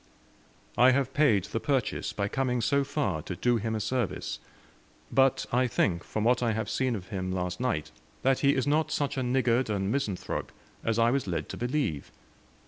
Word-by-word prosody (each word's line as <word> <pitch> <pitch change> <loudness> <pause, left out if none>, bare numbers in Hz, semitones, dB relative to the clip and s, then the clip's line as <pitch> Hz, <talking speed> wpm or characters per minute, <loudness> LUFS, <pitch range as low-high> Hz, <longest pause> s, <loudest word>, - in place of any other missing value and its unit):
I 125 +1 +8
have 135 0 0
paid 125 -11 +4
the 105 +3 -3
purchase, 135 -1 -1
by 100 -1 -2
coming 125 +1 0
so 140 +4 +2
far 135 - -1
to 90 - -6
do 120 +6 +2
him 110 0 -2
a - - -1
service. 110 0 -2 0.7
But 135 -1 +3
I 125 +1 +3
think, 90 -7 0
from 110 - -3
what 125 +2 +3
I 115 -2 +1
have 110 -2 -3
seen 130 -3 0
of 90 -4 -8
him 95 -2 -3
last 90 -1 -2
night, 120 -12 -1 0.3
that 135 0 +3
he 140 0 +3
is 130 - 0
not 150 +2 +2
such 145 -3 -1
a 135 - -1
niggard 125 -1 +1
and 100 -1 -1
misanthrope 110 -9 -2 0.3
as 115 -1 0
I 115 0 +4
was 135 -4 0
led 85 -4 -3
to - - -6
believe. 120 - -2
120 Hz, 195 wpm, -28 LUFS, 100-135 Hz, 0.7 s, I